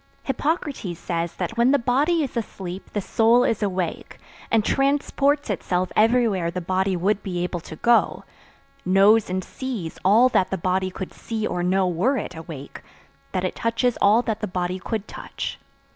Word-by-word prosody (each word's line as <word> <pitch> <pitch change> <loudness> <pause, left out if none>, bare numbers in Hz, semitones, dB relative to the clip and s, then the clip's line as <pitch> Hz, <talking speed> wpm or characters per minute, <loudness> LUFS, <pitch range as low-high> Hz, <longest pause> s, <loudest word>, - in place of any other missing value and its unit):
Hippocrates 275 - -2
says 170 0 -3
that 225 - -4
when 235 +2 +4
the 285 - +5
body 285 +7 +2
is 275 - -5
asleep 190 -5 -5
the 205 - -1
soul 230 +5 +3
is 225 -3 0
awake, 185 -4 -3 0.3
and 220 -2 +2
transports 280 +1 +1
itself 180 0 -1
everywhere 220 -6 +3
the 180 +2 -3
body 185 +2 0
would 195 +4 +1
be 180 -3 -3
able 180 0 -3
to 160 - -10
go; 235 +8 +2 0.6
knows 200 +4 +4
and 185 +1 -2
sees 230 -11 -6
all 220 +7 +6
that 190 - +2
the 190 - -2
body 185 +2 0
could 190 0 -7
see 220 -2 -4
or 180 - -2
know 185 +1 +2
were 190 +11 +1
it 190 -5 -5
awake; 160 -4 -9 0.5
that 185 -1 -1
it 185 - -2
touches 230 +1 0
all 215 +4 +5
that 220 -3 -2
the 210 - -3
body 180 0 -2
could 215 +2 -4
touch. - - -6
200 Hz, 175 wpm, -23 LUFS, 180-235 Hz, 0.6 s, all